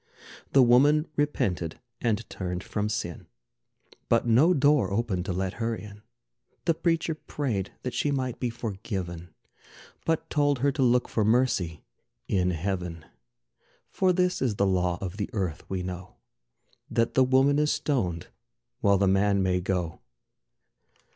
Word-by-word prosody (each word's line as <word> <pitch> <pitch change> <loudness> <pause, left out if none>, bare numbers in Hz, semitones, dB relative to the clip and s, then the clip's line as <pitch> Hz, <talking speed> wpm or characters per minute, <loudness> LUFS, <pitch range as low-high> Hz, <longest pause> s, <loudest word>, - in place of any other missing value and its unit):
The 135 - +7
woman 145 +6 +5
repented 95 - -1 0.2
and 115 -2 0
turned 90 -1 -4
from 105 0 -2
sin, 85 -6 -4 0.8
But 115 0 +3
no 125 +9 +5
door 145 - +3
opened 100 -4 -1
to - - -2
let 95 +1 -2
her 115 0 0
in. 105 -1 -11 0.6
The 170 - +3
preacher 165 0 0
prayed 125 -10 -3
that 125 - -3
she 145 - 0
might 130 -3 -2
be 125 - -1
forgiven, 95 -6 -5 0.7
But 160 0 0
told 145 -2 +2
her 140 +3 +2
to 140 0 -3
look 125 -1 +3
for 110 - 0
mercy 110 -8 +1 0.4
in 90 -2 +1
Heaven. 90 -2 -3 0.9
For 185 -1 +2
this 180 0 +1
is 120 -6 +1
the 100 - +2
law 90 -2 +1
of 95 0 -5
the 105 - -3
earth, 95 -7 -3
we 95 -1 -2
know: 90 0 -7 0.7
That 115 0 +1
the 130 - +5
woman 135 +3 +4
is 150 0 +2
stoned, 90 - -1 0.5
while 100 -1 +4
the 100 +1 +2
man 100 +1 +3
may 90 -1 +1
go. 90 -3 -2
105 Hz, 150 wpm, -27 LUFS, 95-135 Hz, 0.9 s, The